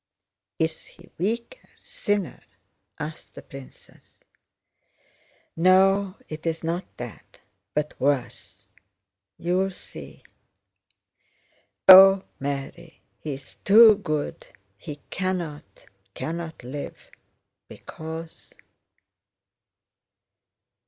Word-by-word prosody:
"Is 160 0 -2
he - - -19
weaker? 235 - -3
Thinner?" 205 -3 -3 0.6
asked 155 +2 -8
the - - -10
princess. 135 -1 -15 1.4
"No, 190 +2 +4
it's 160 +1 -4
not 170 +3 -2
that, 120 -2 -10 0.4
but 150 0 -2
worse. 135 -3 -2 0.7
You 175 +2 0
will 195 0 +1
see. 190 - -11 1.6
O, 195 0 +10 0.2
Mary, 140 +4 -6 0.2
he 150 -3 -4
is 135 - -13
too 220 +2 +9
good, 155 -7 -4 0.3
he 150 +8 -8 0.2
cannot, 170 - -4 0.3
cannot 165 -3 -5
live, 140 +4 -6 0.7
because..." 160 +1 -9
165 Hz, 80 wpm, -25 LUFS, 150-190 Hz, 1.6 s, O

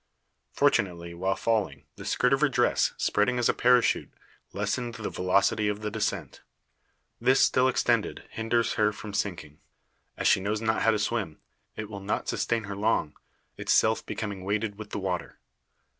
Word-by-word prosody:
Fortunately, 85 -3 +1
while 95 +3 -1
falling, 105 -12 -1
the - - -10
skirt 125 +2 +2
of 135 - +2
her 150 - +4
dress, - - +2
spreading 115 +5 +1
as 120 - +2
a - - +3
parachute, 125 -1 +3 0.4
lessened 120 -2 -2
the 115 -2 -5
velocity 100 +3 +2
of 105 0 -2
the 105 0 -3
descent. 110 0 -3 0.8
This 130 +3 +3
still 130 0 +4
extended, 130 - 0
hinders 115 +1 0
her 105 -1 +2
from 105 -1 -8
sinking. 85 -8 -3 0.6
As - - 0
she - - +5
knows 105 +3 -1
not 110 0 0
how - - +4
to 110 - +3
swim, 105 -6 -2 0.4
it 110 - -5
will 100 -2 -7
not 100 - -2
sustain 115 -2 0
her 100 -1 -6
long; 100 -7 0 0.4
itself 110 0 +2
becoming 100 -3 -5
weighted 105 +2 -1
with 105 -1 -8
the - - -4
water. 95 -3 -3
105 Hz, 165 wpm, -27 LUFS, 100-115 Hz, 0.8 s, she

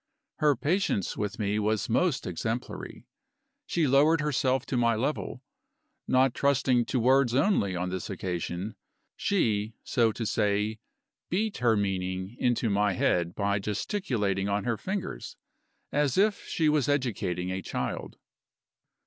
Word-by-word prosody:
Her 150 -2 +3
patience 155 - 0
with 105 +1 -3
me 105 0 0
was 105 0 0
most 145 +5 +1
exemplary. 110 +7 -4 0.6
She 165 -2 +1
lowered 145 +4 +4
herself 135 -3 +1
to - - -3
my 120 -1 +3
level. 135 +7 -2 0.6
Not 130 -1 +3
trusting 130 -3 +2
to 130 - 0
words 130 0 +4
only 135 - +2
on 90 +1 -2
this 95 -1 -4
occasion, 90 +1 -3 0.4
she 110 - 0
(so 115 -2 +2
to 115 +2 -4
say) 105 0 0 0.5
beat 210 +4 0
her 115 -3 +3
meaning 95 0 -2
into 120 -1 +1
my 100 0 +2
head 85 -1 +1
by 100 0 0
gesticulating 105 - -1
on 100 0 0
her 115 +1 0
fingers, 190 - -5 0.5
as 145 0 +1
if 205 +1 +2
she 160 - +1
was 150 -3 +2
educating 95 -10 -1
a 95 +1 -3
child. - - -4
115 Hz, 135 wpm, -28 LUFS, 100-140 Hz, 0.6 s, lowered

